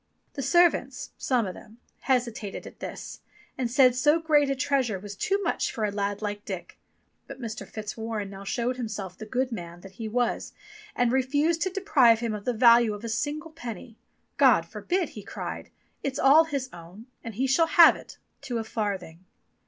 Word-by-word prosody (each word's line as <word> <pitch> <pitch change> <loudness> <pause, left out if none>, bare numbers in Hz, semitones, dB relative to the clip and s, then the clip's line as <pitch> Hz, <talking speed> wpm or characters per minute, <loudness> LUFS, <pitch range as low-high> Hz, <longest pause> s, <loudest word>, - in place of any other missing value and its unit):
The 280 - -4
servants, 315 -5 +2
some 250 -4 0
of 185 - -4
them, 220 +3 -14 0.2
hesitated 240 -6 -2
at - - -12
this, - - -7 0.4
and 250 -3 -2
said 255 0 +5
so 295 +6 +3
great 300 -3 +3
a 275 - +1
treasure 260 -6 0
was 200 +1 -8
too 390 - 0
much 340 - -1
for 220 - -2
a 205 - -1
lad 200 +1 -2
like 205 0 -4
Dick; 190 -3 -7 0.5
but - - -9
Mr. 230 -2 -6
Fitzwarren 215 -1 -5
now 195 0 -9
showed 240 +5 -2
himself 210 -6 -5
the 215 +3 -9
good 255 +3 -1
man 175 -5 -7
that 195 - -12
he 220 - -3
was 240 +2 -1 0.4
and 245 -1 +2
refused 290 +6 +1
to 375 - +1
deprive 325 - +4
him 230 -2 -2
of 210 -1 -6
the 250 - +1
value 235 -1 +5
of 205 - -11
a 230 - -4
single 295 +7 -3
penny. 235 - -8 0.4
"God - - +5
forbid!" 360 -3 -2
he 210 - -9
cried. - - -7 0.3
"It's 275 -1 -3
all 300 +4 +6
his 280 -4 -3
own, 175 +6 -12 0.2
and 230 -3 -7
he 260 +5 0
shall 300 +5 +3
have 340 -1 +7
it, - - -12 0.2
to 245 -2 -3
a 225 - -2
farthing." 195 -6 -4
235 Hz, 190 wpm, -27 LUFS, 210-275 Hz, 0.5 s, have